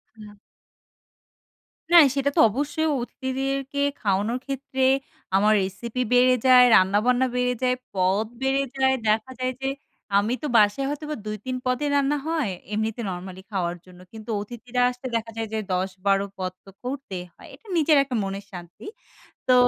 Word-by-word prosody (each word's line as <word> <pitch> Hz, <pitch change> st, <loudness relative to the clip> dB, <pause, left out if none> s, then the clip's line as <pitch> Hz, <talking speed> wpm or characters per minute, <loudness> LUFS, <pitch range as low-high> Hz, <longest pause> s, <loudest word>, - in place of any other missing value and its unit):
হুম। 210 Hz, -1 st, -13 dB, 1.6 s
না, -, -, +10 dB, 0.2 s
সেটা 280 Hz, 0 st, +1 dB
তো -, -, +2 dB
অবশ্যই। 290 Hz, +7 st, -1 dB
অতিথিদেরকে 270 Hz, +2 st, -3 dB, 0.2 s
খাওয়ানোর 205 Hz, +4 st, 0 dB
ক্ষেত্রে 270 Hz, -1 st, -3 dB, 0.5 s
আমার 210 Hz, +2 st, +4 dB
রেসিপি 225 Hz, +6 st, -4 dB
বেড়ে 255 Hz, +1 st, +5 dB
যায়, 250 Hz, -1 st, +8 dB
রান্নাবান্না 215 Hz, +7 st, +3 dB
বেড়ে 250 Hz, 0 st, +1 dB
যায়, 250 Hz, 0 st, +3 dB, 0.2 s
পদ 190 Hz, +3 st, +1 dB, 0.2 s
বেড়ে 270 Hz, +1 st, +2 dB, 0.2 s
যায়। 265 Hz, 0 st, +3 dB
দেখা 220 Hz, +4 st, +1 dB
যায় 255 Hz, 0 st, 0 dB
যে 270 Hz, -, 0 dB, 0.5 s
আমি 210 Hz, +4 st, +1 dB
তো -, -, 0 dB
বাসায় 210 Hz, +5 st, +3 dB
হয়তোবা 300 Hz, +1 st, -4 dB
২-৩ 215 Hz, +4 st, -4 dB
পদের 255 Hz, +4 st, 0 dB
রান্না 285 Hz, +1 st, +2 dB
হয়, 315 Hz, -10 st, 0 dB, 0.2 s
এমনিতে 220 Hz, +2 st, -2 dB
নরমালি 185 Hz, +1 st, -7 dB
খাওয়ার 175 Hz, -3 st, -1 dB
জন্য, 180 Hz, -1 st, -16 dB
কিন্তু 220 Hz, 0 st, -11 dB
অতিথিরা 240 Hz, +3 st, -4 dB
আসলে 250 Hz, +1 st, -7 dB
দেখা 225 Hz, 0 st, -2 dB
যায় 225 Hz, 0 st, -2 dB
যে 220 Hz, -, 0 dB
১০-১২ 190 Hz, +2 st, 0 dB
পদ 185 Hz, -1 st, -3 dB
তো -, -, -13 dB
করতেই 250 Hz, -8 st, -5 dB
হয়। -, -, -15 dB
এটা 455 Hz, -, -23 dB
নিজের 310 Hz, -1 st, +4 dB
একটা 265 Hz, -2 st, -4 dB
মনের 195 Hz, +1 st, -5 dB
শান্তি। 175 Hz, -, -10 dB, 0.6 s
তো 255 Hz, -, +5 dB
240 Hz, 150 wpm, -24 LUFS, 200-265 Hz, 1.6 s, না